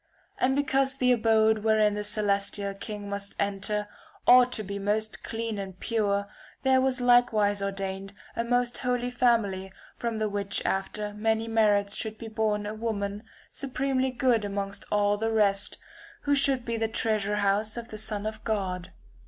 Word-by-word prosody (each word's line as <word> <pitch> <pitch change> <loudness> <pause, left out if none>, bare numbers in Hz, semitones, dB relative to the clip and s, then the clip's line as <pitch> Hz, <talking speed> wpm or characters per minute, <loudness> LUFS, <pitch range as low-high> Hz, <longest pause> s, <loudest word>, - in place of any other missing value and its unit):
And 265 +1 +2
because 270 -1 +1
the 250 -1 +3
abode 220 -2 +3
wherein 215 -1 +3
the 210 0 -3
celestial 200 -1 0
king 205 +1 -7
must 200 0 -4
enter 205 +1 -1 0.4
ought 250 0 +7
to 215 - 0
be 200 0 -5
most 215 +2 -1
clean 225 -2 -3
and 190 -2 -7
pure 200 -3 0 0.4
there 260 -1 +4
was 265 0 +1
like 245 0 +5
wise 205 -2 +1
ordained 195 0 -4 0.2
a 230 - 0
most 245 0 0
holy 250 -1 -1
family 220 -6 +1 0.2
from 235 -2 -3
the 215 0 0
which 200 -1 -2
after 205 +2 -2
many 220 +1 0
merits 205 -3 +2
should 220 0 -3
be 225 0 -8
born 215 -1 0
a 210 - -4
woman 210 -2 -3 0.3
supremely 265 -1 -1
good 245 -3 +2
amongst 200 0 -4
all 205 0 +2
the 225 +2 -1
rest, 205 -2 +2 0.5
who 285 - +2
should 275 -3 +2
be 230 -1 -2
the 225 0 0
treasure 215 -2 0
house 210 +2 +1
of 235 0 -6
the 215 - -7
Son 210 -1 0
of 215 0 -5
God. 185 -4 -2
215 Hz, 170 wpm, -27 LUFS, 200-235 Hz, 0.5 s, ought